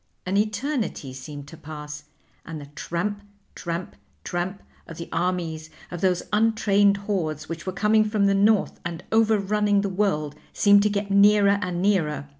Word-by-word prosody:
An 185 Hz, +2 st, -1 dB
eternity 215 Hz, -, -1 dB
seemed 140 Hz, +2 st, -9 dB
to 165 Hz, -, -11 dB
pass, 150 Hz, -1 st, -8 dB, 0.4 s
and 160 Hz, -1 st, -7 dB
the 145 Hz, -, -9 dB
tramp, 205 Hz, +7 st, -3 dB, 0.3 s
tramp, 170 Hz, +1 st, -5 dB, 0.3 s
tramp 180 Hz, +2 st, -4 dB, 0.2 s
of 165 Hz, -, -9 dB
the 170 Hz, -, -6 dB
armies 165 Hz, -2 st, -2 dB, 0.2 s
of 175 Hz, -1 st, -6 dB
those 185 Hz, -2 st, +1 dB
untrained 210 Hz, -2 st, +3 dB
hordes 155 Hz, -7 st, -2 dB
which 165 Hz, +2 st, -7 dB
were -, -, 0 dB
coming 215 Hz, +3 st, +3 dB
from 210 Hz, -1 st, +1 dB
the 200 Hz, -, +3 dB
North 205 Hz, +1 st, +2 dB
and 170 Hz, -1 st, -5 dB
overrunning 210 Hz, -2 st, +2 dB
the 200 Hz, -, -2 dB
world 180 Hz, -7 st, 0 dB, 0.2 s
seemed 205 Hz, -1 st, +5 dB
to 210 Hz, -, +2 dB
get 200 Hz, -1 st, -2 dB
nearer 200 Hz, 0 st, +5 dB
and 180 Hz, -2 st, -2 dB
nearer. 155 Hz, -8 st, 0 dB
195 Hz, 160 wpm, -24 LUFS, 165-205 Hz, 0.4 s, seemed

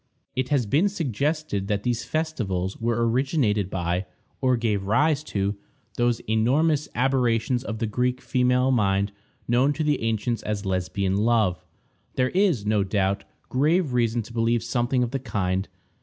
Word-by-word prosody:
It 130 Hz, 0 st, -1 dB
has 140 Hz, -5 st, +2 dB
been 150 Hz, -, +2 dB
suggested 150 Hz, -, -2 dB
that 100 Hz, -1 st, -1 dB
these 120 Hz, 0 st, -1 dB
festivals 110 Hz, -, -2 dB
were 115 Hz, 0 st, 0 dB
originated 115 Hz, -, +1 dB
by, 90 Hz, 0 st, -2 dB, 0.3 s
or 130 Hz, -1 st, +3 dB
gave 105 Hz, -4 st, -1 dB
rise 150 Hz, +7 st, +2 dB
to, 100 Hz, -3 st, -1 dB, 0.4 s
those 120 Hz, -1 st, +1 dB
enormous 140 Hz, +8 st, +1 dB
aberrations 125 Hz, -1 st, +1 dB
of 110 Hz, -4 st, -4 dB
the 115 Hz, -, -1 dB
Greek 125 Hz, +4 st, 0 dB
female 125 Hz, 0 st, +2 dB
mind 100 Hz, -4 st, +2 dB, 0.4 s
known 125 Hz, +5 st, +3 dB
to 155 Hz, -, -2 dB
the 150 Hz, -2 st, +1 dB
ancients 115 Hz, +1 st, -1 dB
as 105 Hz, -1 st, -3 dB
Lesbian 95 Hz, +1 st, -1 dB
love. 105 Hz, -6 st, +2 dB, 0.5 s
There 130 Hz, 0 st, +2 dB
is, 180 Hz, -, +2 dB
no 105 Hz, -1 st, +2 dB
doubt, 100 Hz, 0 st, 0 dB, 0.2 s
grave 150 Hz, +2 st, +1 dB
reason 120 Hz, -1 st, +1 dB
to 115 Hz, -, -12 dB
believe 115 Hz, 0 st, +1 dB
something 125 Hz, 0 st, 0 dB
of 120 Hz, -, -3 dB
the 135 Hz, -, -2 dB
kind. 95 Hz, -6 st, -1 dB
120 Hz, 155 wpm, -25 LUFS, 105-130 Hz, 0.5 s, or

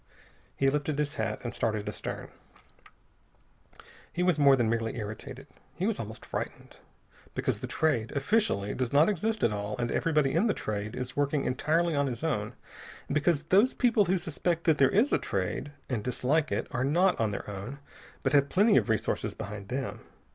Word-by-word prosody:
He 135 Hz, -, +2 dB
lifted 145 Hz, +1 st, 0 dB
his 150 Hz, -1 st, -1 dB
hat -, -, -2 dB
and 120 Hz, -1 st, -4 dB
started 110 Hz, -3 st, -1 dB
astern. -, -, -5 dB, 1.8 s
He 175 Hz, +3 st, -1 dB
was 180 Hz, -4 st, +2 dB
more 140 Hz, -2 st, +7 dB
than 120 Hz, -3 st, +1 dB
merely 115 Hz, 0 st, -1 dB
irritated. 110 Hz, -1 st, -7 dB, 0.3 s
He -, -, -2 dB
was -, -, 0 dB
almost -, -, -7 dB
frightened. -, -, -6 dB, 0.6 s
Because -, -, 0 dB
the -, -, -5 dB
Trade, 125 Hz, -9 st, 0 dB
officially, 140 Hz, -, +1 dB
does 125 Hz, -2 st, -2 dB
not 150 Hz, +5 st, +5 dB
exist 215 Hz, +2 st, -1 dB
at 115 Hz, -, +4 dB
all, 105 Hz, 0 st, -3 dB
and 120 Hz, -1 st, -1 dB
everybody 150 Hz, -4 st, +2 dB
in 175 Hz, +9 st, +3 dB
the 210 Hz, -, +1 dB
Trade 105 Hz, 0 st, -4 dB
is 125 Hz, 0 st, -5 dB
working 145 Hz, 0 st, +1 dB
entirely 160 Hz, +6 st, +1 dB
on 140 Hz, 0 st, +2 dB
his 125 Hz, +2 st, -5 dB
own; 110 Hz, -11 st, -1 dB, 0.5 s
and -, -, -3 dB
because 150 Hz, 0 st, +2 dB
those 200 Hz, +10 st, +4 dB
people 230 Hz, -5 st, +3 dB
who 190 Hz, +2 st, +2 dB
suspect 170 Hz, -1 st, -1 dB
that 160 Hz, -4 st, +3 dB
there 135 Hz, -2 st, +6 dB
is 225 Hz, -, +3 dB
a -, -, +4 dB
Trade 95 Hz, +8 st, -2 dB, 0.2 s
and 120 Hz, -5 st, -2 dB
dislike 140 Hz, +5 st, 0 dB
it -, -, 0 dB
are 125 Hz, -, -1 dB
not 175 Hz, +7 st, +3 dB
on 110 Hz, -2 st, +2 dB
their 100 Hz, -, -5 dB
own, 100 Hz, +7 st, -6 dB, 0.5 s
but -, -, +1 dB
have 140 Hz, -1 st, +4 dB
plenty 205 Hz, +3 st, +4 dB
of -, -, +2 dB
resources 110 Hz, -, -1 dB
behind 105 Hz, -2 st, -7 dB
them. 130 Hz, +1 st, -3 dB
140 Hz, 185 wpm, -29 LUFS, 115-165 Hz, 1.8 s, more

